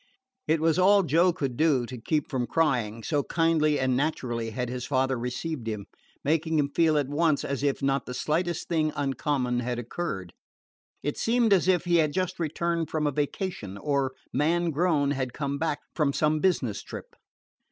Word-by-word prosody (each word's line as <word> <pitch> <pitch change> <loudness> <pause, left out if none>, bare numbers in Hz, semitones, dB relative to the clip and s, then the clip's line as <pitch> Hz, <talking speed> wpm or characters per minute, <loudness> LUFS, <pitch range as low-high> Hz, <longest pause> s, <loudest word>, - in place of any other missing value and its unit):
It 160 0 +3
was 160 +2 +2
all 200 +2 +6
Joe 170 +3 +4
could 140 -8 -3
do 145 -4 +2
to 125 0 -8
keep 150 +4 0
from 125 -2 -2
crying, 120 -9 0
so 145 -3 +1
kindly 155 -1 +2
and 130 -1 +1
naturally 125 -5 -1
had 125 +3 -3
his 125 0 -4
father 130 0 +1
received 125 +2 -4
him, 105 -3 -3 0.4
making 160 +2 +1
him 140 -1 +1
feel 160 -1 +3
at 145 -3 +1
once 150 +1 +1
as 140 -1 -2
if 140 -1 0
not 135 0 +1
the 125 - -5
slightest 170 +5 -1
thing 155 -2 +1
uncommon 135 -3 0
had 125 0 -2
occurred. 115 - -4 0.7
It 145 - -2
seemed 230 -2 +3
as 185 -2 +3
if 180 -2 +3
he 175 -1 +3
had 155 -3 +2
just 185 0 -2
returned 170 +1 -1
from 155 -1 -1
a 145 - +2
vacation, 145 - -3
or, 140 +1 0 0.2
man 170 +3 +1
grown, 150 -3 +2
had 130 -3 -2
come 140 -1 -3
back 160 -2 0 0.2
from 145 -4 +1
some 155 +1 +2
business 145 - +1
trip. - - -9
145 Hz, 185 wpm, -27 LUFS, 130-165 Hz, 0.7 s, all